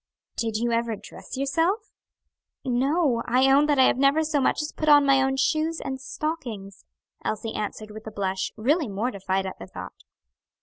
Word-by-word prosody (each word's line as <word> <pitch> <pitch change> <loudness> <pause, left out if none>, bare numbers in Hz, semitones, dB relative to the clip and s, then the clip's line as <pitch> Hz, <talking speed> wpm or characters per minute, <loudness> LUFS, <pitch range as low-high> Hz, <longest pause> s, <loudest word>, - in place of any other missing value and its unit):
"Did 225 -2 -1
you 235 +1 0
ever 230 -1 0
dress 235 - -10
yourself?" 330 +11 0 0.7
"No, 265 +1 +1
I 260 +3 +4
own 285 +2 +5
that 290 -1 +2
I 260 - +6
have 255 - +3
never 280 +3 +4
so 300 -2 0
much - - +2
as 300 - -4
put 310 - -1
on 290 -1 +7
my 275 -1 +5
own 270 0 +1
shoes 315 +4 +1
and 265 -1 -5
stockings," 240 - -5 0.4
Elsie 220 +1 -3
answered 215 0 -5
with 215 +1 -10
a - - -5
blush, 190 -2 -2
really 290 +7 +1
mortified 195 -2 -2
at 190 - -6
the - - -8
thought. - - -10
265 Hz, 180 wpm, -25 LUFS, 220-295 Hz, 0.7 s, on